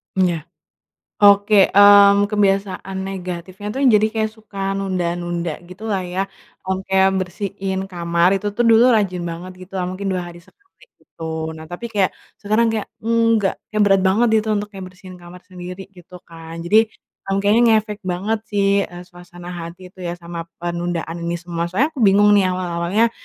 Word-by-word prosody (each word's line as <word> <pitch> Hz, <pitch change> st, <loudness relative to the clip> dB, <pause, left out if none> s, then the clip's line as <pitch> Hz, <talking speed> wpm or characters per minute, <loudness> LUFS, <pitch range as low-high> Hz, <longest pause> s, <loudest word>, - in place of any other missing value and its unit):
M 190 Hz, -, +3 dB
ya. 170 Hz, -2 st, -2 dB, 0.8 s
Oke, 205 Hz, 0 st, +5 dB
mmm, 200 Hz, 0 st, +7 dB
kebiasaan 195 Hz, -2 st, 0 dB
negatifnya 185 Hz, +1 st, -7 dB
tuh, 265 Hz, -, -4 dB
jadi 215 Hz, -2 st, +5 dB
kayak 220 Hz, -1 st, -1 dB
suka 195 Hz, -3 st, -4 dB
nunda-nunda, 175 Hz, -3 st, -2 dB
gitu 185 Hz, +5 st, -9 dB
lah 195 Hz, -3 st, -1 dB
ya. 185 Hz, +2 st, -3 dB, 0.3 s
Mmm, 190 Hz, 0 st, -3 dB
kayak 190 Hz, 0 st, +4 dB
bersihin 190 Hz, +1 st, -4 dB
kamar, 170 Hz, -1 st, +1 dB
itu 200 Hz, +2 st, -5 dB
tuh 240 Hz, +4 st, 0 dB
dulu 225 Hz, +1 st, +6 dB
rajin 195 Hz, -5 st, +1 dB
banget, 170 Hz, +2 st, -6 dB
gitu 185 Hz, -, -27 dB
lah, -, -, -1 dB
mungkin 185 Hz, +2 st, -5 dB
2 180 Hz, -, -2 dB
hari 170 Hz, 0 st, -13 dB
sekali, 405 Hz, -, -25 dB, 0.2 s
gitu. 165 Hz, -, -12 dB, 0.3 s
Nah 160 Hz, -, -9 dB
tapi 175 Hz, +9 st, -7 dB
kayak, 200 Hz, -4 st, +1 dB, 0.2 s
sekarang 215 Hz, +2 st, +1 dB
kayak, 220 Hz, -2 st, -2 dB
nggak 230 Hz, -3 st, +2 dB, 0.2 s
kayak 215 Hz, -, 0 dB
berat 195 Hz, -1 st, +4 dB
banget 200 Hz, +6 st, +3 dB, 0.2 s
gitu, -, -, -5 dB
untuk 210 Hz, 0 st, -2 dB
kayak 195 Hz, -2 st, -9 dB
bersihin 185 Hz, 0 st, -13 dB
kamar 175 Hz, 0 st, -13 dB
sendiri, 180 Hz, +1 st, -9 dB
gitu 180 Hz, -2 st, -15 dB
kan. 165 Hz, 0 st, -9 dB
Jadi, 175 Hz, +6 st, +3 dB, 0.5 s
ng 195 Hz, 0 st, -1 dB
kayaknya 210 Hz, +4 st, +4 dB, 0.2 s
ngefek 210 Hz, -1 st, -8 dB
banget 195 Hz, +5 st, -1 dB
sih, 200 Hz, -2 st, 0 dB, 0.2 s
eee, 175 Hz, 0 st, -10 dB
suasana 175 Hz, 0 st, -12 dB
hati 175 Hz, +1 st, -8 dB
itu 185 Hz, -, -30 dB
ya, 170 Hz, 0 st, -3 dB
sama 170 Hz, -1 st, -7 dB, 0.2 s
penundaan 170 Hz, -1 st, -3 dB
ini 170 Hz, -, -1 dB
semua. 170 Hz, -1 st, -3 dB
Soalnya 215 Hz, -, 0 dB
aku 315 Hz, -, -12 dB
bingung 205 Hz, +1 st, +5 dB
nih 200 Hz, -, +4 dB
awal-awalnya, 180 Hz, +4 st, 0 dB
190 Hz, 175 wpm, -20 LUFS, 175-205 Hz, 0.8 s, mmm